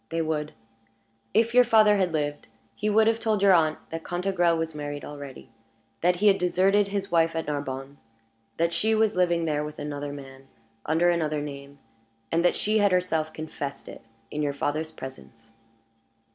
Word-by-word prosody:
"They 165 0 -1
would. 150 -1 -2 0.8
If 230 +3 +2
your 250 0 +7
father 215 -3 +5
had 185 -3 +1
lived, 145 -2 -3 0.3
he 215 - -2
would 220 +1 +4
have 225 0 +2
told 215 -3 0
your 195 -1 +7
aunt 155 -3 +3
that 165 0 -5
Cantegrel 175 -2 +1
was 160 0 -3
married 145 -1 -5
already; 145 -4 -10 0.5
that 180 +1 +3
he 205 +4 +2
had 195 -1 +5
deserted 195 +3 +3
his 200 0 -3
wife 165 -1 +2
at 165 - -2
Narbonne; 140 -1 -5 0.6
that 170 +1 +1
she 220 +4 +1
was 220 -1 +2
living 175 -2 +2
there 150 -2 0
with 150 0 -7
another 145 -1 -5
man, 135 -1 -11 0.4
under 165 +3 +3
another 155 -3 0
name; 140 -1 -8 0.5
and 165 +1 +2
that 175 - +3
she 215 +1 +1
had 205 -1 +3
herself 165 -4 0
confessed 150 -3 -6
it - - -10 0.3
in 150 - -3
your 145 -1 0
father's 150 +3 -2
presence." 115 -6 -11
165 Hz, 175 wpm, -26 LUFS, 145-195 Hz, 0.8 s, your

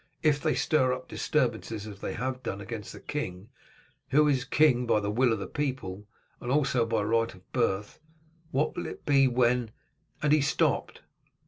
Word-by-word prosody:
If 150 -2 +3
they 155 - +1
stir 130 -5 +2
up 130 0 -6
disturbances, 115 -6 -1
as 100 -2 -9
they - - -3
have 130 +2 -3
done, 100 - -4
against 105 0 -6
the - - -10
king, 100 -8 -5 0.6
who 150 +2 +5
is 135 -3 +1
king 125 -3 +3
by 110 - +3
the 100 0 -2
will 120 +3 +3
of 110 - +1
the 100 - -5
people, 125 -9 -4 0.3
and 120 - -4
also 135 -5 +2
by 110 -2 0
right 115 +2 +1
of 95 -1 -18
birth, 105 -5 -1 0.5
what 145 +1 0
will 175 - -3
it - - -9
be 135 -2 +5
when 125 -1 +2 0.3
" 160 +2 -41
and 150 0 +4
he 155 - +5
stopped. 140 - 0
125 Hz, 190 wpm, -28 LUFS, 110-140 Hz, 0.6 s, who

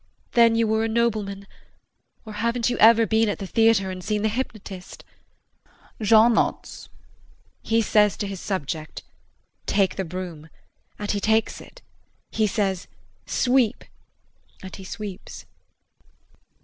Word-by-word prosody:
Then 230 -1 +5
you 230 0 +2
were 220 0 +1
a - - 0
nobleman 215 -4 -1 0.8
or 215 - -8
haven't 235 +3 0
you - - -2
ever 230 +1 +7
been 220 0 +2
at 205 - -2
the 195 - -6
theatre 225 -2 +2
and 185 -1 -7
seen 210 +1 -1
the 220 - +2
hypnotist 210 -6 -6 1.0
[Jean 220 +2 +5
nods] - - -2 0.7
He 225 0 +1
says 210 -1 +3
to - - -3
his 195 -2 -6
subject 160 -5 -5 0.6
"Take 195 -2 +1
the 190 - -1
broom," 170 -3 -7 0.5
and 205 0 -3
he 205 - -1
takes 220 +2 0
it; - - -16 0.5
he 220 -1 +1
says, 195 -2 -1 0.4
"Sweep," 250 -2 +1 0.8
and 190 - -8
he 195 - -10
sweeps. 200 0 -8
210 Hz, 135 wpm, -24 LUFS, 195-225 Hz, 1.0 s, ever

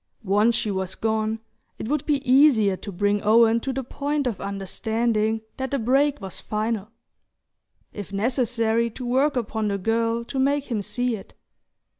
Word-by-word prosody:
Once 210 +4 +3
she 215 - -1
was 190 -1 -3
gone, 220 0 -1 0.4
it - - -5
would 300 +4 0
be 285 -3 0
easier 250 -7 +5
to 200 - -8
bring 205 +2 +1
Owen 225 +2 +5
to 270 - -3
the 265 +1 -3
point 285 +3 -2
of 230 -7 -2
understanding 220 +3 -1 0.2
that 265 0 -3
the 280 - 0
break 275 +4 +2
was 190 -2 -7
final; 215 -1 -2 1.0
if 205 -2 -7
necessary, 230 +1 +1
to 245 +3 -8
work 265 +4 +2
upon 220 -3 -1
the 200 -1 0
girl 230 +3 0
to 265 - -4
make 280 0 +1
him 215 -3 0
see 245 +3 -1
it. 195 - -12
230 Hz, 165 wpm, -24 LUFS, 210-260 Hz, 1.0 s, easier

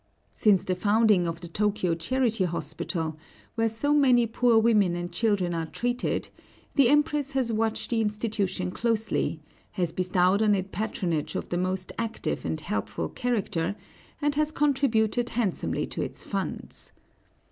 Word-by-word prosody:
Since 200 -4 +3
the 185 - 0
founding 205 -1 +3
of 165 0 -4
the 175 - -7
Tōkyō 185 -2 0
Charity 230 0 +1
Hospital, 165 -2 -3 0.4
where 225 -1 +1
so 285 +7 0
many 255 -5 +5
poor 230 +1 +3
women 210 -6 +4
and 175 0 -4
children 185 -2 +1
are 165 -1 -2
treated, 245 +7 -2 0.4
the 275 -5 +5
Empress 295 -1 +2
has 260 -3 +1
watched 220 +2 -1
the 230 -1 +2
institution 210 -4 -1
closely, 220 -7 0 0.3
has 175 -5 -1
bestowed 185 +2 +2
on 210 -2 +4
it 190 0 -3
patronage 175 -7 -2
of - - -3
the 175 - -1
most 185 0 -2
active 230 -1 -3
and - - -2
helpful - - -3
character, 200 -7 -1 0.5
and 290 0 +2
has 305 +1 +1
contributed 255 -6 +1
handsomely 220 -6 -1
to - - -5
its - - -5
funds. - - -4
215 Hz, 145 wpm, -27 LUFS, 180-240 Hz, 0.5 s, many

